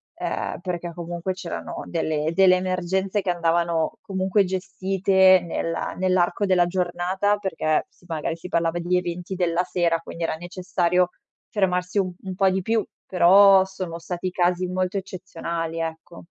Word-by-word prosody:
ehm, - - -3
perché 175 -2 -4
comunque 175 +2 -4
c'erano 180 -2 -6
delle 160 -2 -1
delle 185 +1 +6
emergenze 185 +2 -1
che 190 - -3
andavano 170 -1 0
comunque 195 -1 +1
gestite 190 0 +3
nella 165 0 -3
nell'arco 185 +2 +1
della 180 -2 +4
giornata, 185 +3 0
perché 160 -6 0
sì, - - -26
magari 160 -1 -3
si 170 - -9
parlava 170 -1 0
degli 175 +1 0
eventi 180 +1 -4
della 175 -1 +1
sera, 170 -2 0
quindi 165 0 -7
era 165 - -1
necessario 180 +1 0 0.4
fermarsi 180 -1 0
u 185 -2 -1
un 190 -1 -5
po' 195 +1 +3
di 190 +1 0
più; 225 +3 0 0.2
però 190 +2 +6
sono 185 -3 -6
stati 180 +1 -4
casi 180 0 +1
molto 185 +1 -1
eccezionali, 170 -3 -5
ecco. 165 +1 -6
180 Hz, 145 wpm, -24 LUFS, 170-190 Hz, 0.4 s, delle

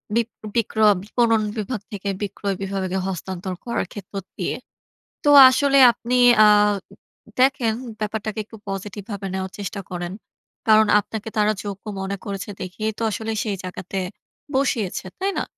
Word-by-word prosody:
Beep 235 -1 +2 0.3
বিক্র 220 -1 0 0.2
বিপণন 225 +1 +2 0.2
বিভাগ 215 0 -3
থেকে 200 -1 -4
বিক্রয় 200 -1 -2
বিভাগে 190 -1 -2
হস্তান্তর 185 0 -4
করার 235 - -1
ক্ষেত্র 205 -2 -10 0.2
দিয়ে। - - -2 0.7
তো 290 - +3 0.2
আসলে 275 +1 +3
আপনি 235 +1 -3 0.3
আ - - +8 0.9
দেখেন, 255 -4 +3 0.3
ব্যাপারটাকে 215 0 -3
একটু 225 - -13
পজিটিভভাবে 200 +1 -5
নেওয়ার 190 0 -3
চেষ্টা 200 0 -4
করেন। 175 -1 -4 0.5
কারণ 215 0 +6
আপনাকে 220 +1 -6
তারা 210 0 +4
যোগ্য 200 -1 -6 0.2
মনে 195 +1 -3
করেছে 200 0 -5
দেখেই 215 +4 -3
তো - - -7
আসলে 220 +2 -3
সেই 205 -3 -2
জায়গাতে 185 +1 -5 0.6
বসিয়েছে। 225 -9 0
তাই 390 +1 0
না? - - 0
205 Hz, 140 wpm, -22 LUFS, 195-225 Hz, 0.9 s, আ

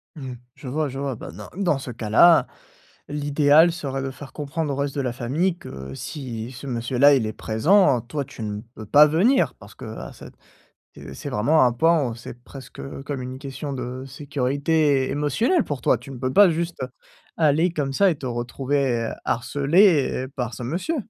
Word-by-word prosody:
Mmh 135 -4 -7
mh. - - -7 0.2
Je 140 - -11
vois, 150 +3 -1
je 135 - -7
vois, 140 -2 -2
bah - - -9
dans 105 +5 -10
dans 180 -7 +1
ce 130 - -7
cas-là, 120 +9 +5 0.6
l'idéal 145 +2 +4
serait 140 -5 -4
de 135 - -3
faire 140 +1 -11
comprendre 150 0 -3
au - - -3
reste 140 -1 -2
de 140 - 0
la 125 -3 -1
famille 150 +9 -1
que 65 - -9
si 120 - -6
ce 130 +2 -9
monsieur-là, 125 +3 +3
il 125 -5 +1
est 110 - -4
présent, 135 - +3
toi, 130 +5 -4
tu 130 -3 -11
ne 105 0 -4
peux 110 - -8
pas 145 +8 +7
venir 170 - +2
parce 105 +1 -15
qu'à 110 -3 -8
cette, - - -13 0.6
heu, - - -9
c'est - - -7
vraiment 130 +8 +3
un 120 - +2
pan 150 -2 +2
c'est 120 +1 -10
presque 135 -2 -12 0.2
comme 140 -2 -4
une 130 +1 -7
question 140 +1 -6
de 130 0 -5
sécurité 140 +1 0
émotionnelle 150 - +1
pour 145 -3 -5
toi! - - +3
Tu 125 +4 -12
ne 130 - -8
peux 130 +1 -2
pas 200 -2 +7
juste 170 +1 -3 0.6
aller 160 +3 +3
comme 140 -5 -2
ça 200 +6 +4
et - - -2
te 135 - -8
retrouver 125 0 -1
harcelée 145 - +2
par 125 -3 -3
ce 120 - -8
monsieur! 175 - -2
135 Hz, 190 wpm, -23 LUFS, 125-150 Hz, 0.6 s, pas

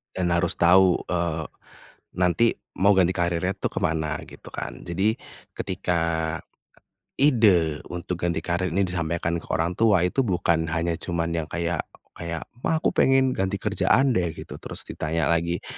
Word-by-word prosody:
Dan 90 -2 0
harus 85 - +1
tahu, 90 +1 +5
eee, 85 -3 -1 0.7
nanti 90 +6 +3 0.3
mau 100 +1 +5
ganti 90 -1 +4
karirnya 85 0 0
itu - - -2
ke - - -4
mana, 80 -1 0
gitu - - -14
kan. - - -6
Jadi, 95 +6 0 0.4
ketika 90 -2 -2 1.2
ide 100 - +4
untuk 90 0 -5
ganti 85 -1 0
karir 90 0 -1
ini 95 +3 +1
disampaikan 85 -1 -2
ke - - -16
orang 85 +2 0
tua, 100 -4 +3
itu 135 - 0
bukan 85 -6 +1
hanya 85 +1 0
cuman 85 -1 -2
yang - - -15
kayak 85 0 -1 0.4
kayak, 85 -1 -4 0.2
"Ma - - +2
aku - - +3
pengen 135 0 +3
ganti 95 -4 -2
kerjaan 125 +6 +3
deh" 90 -9 0
gitu, - - -9
terus - - -7
ditanya 80 +2 -2
lagi, 85 +1 0
85 Hz, 155 wpm, -25 LUFS, 85-95 Hz, 1.2 s, tahu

